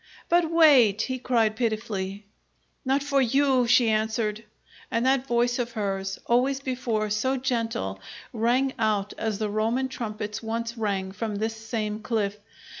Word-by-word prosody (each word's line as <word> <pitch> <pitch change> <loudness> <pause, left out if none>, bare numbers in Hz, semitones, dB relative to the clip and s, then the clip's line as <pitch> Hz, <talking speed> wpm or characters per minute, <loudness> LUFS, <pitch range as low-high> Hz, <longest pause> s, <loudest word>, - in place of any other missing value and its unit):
"But 345 -1 +3
wait," 265 -11 +5
he 260 -1 -3
cried 225 -4 +1
pitifully. 215 -4 -3 0.6
"Not 270 +1 +1
for 280 -1 +2
you!" 265 0 +3
she 245 0 +5
answered, 220 0 -1 0.5
and 230 +2 0
that 265 0 +2
voice 240 0 +1
of 240 -1 -2
hers, 195 -3 -2
always 260 +3 +2
before 245 -5 -2
so 260 +6 +1
gentle, 230 - -2 0.3
rang 245 +4 +1
out 210 -2 0
as 220 -2 -1
the 215 -1 -2
Roman 230 +5 0
trumpets 215 -4 -5
once 230 +1 -3
rang 200 -4 -2
from 215 +1 -4
this 220 +2 -2
same 220 -1 -3
cliff. 215 -3 -1
230 Hz, 145 wpm, -26 LUFS, 215-255 Hz, 0.6 s, wait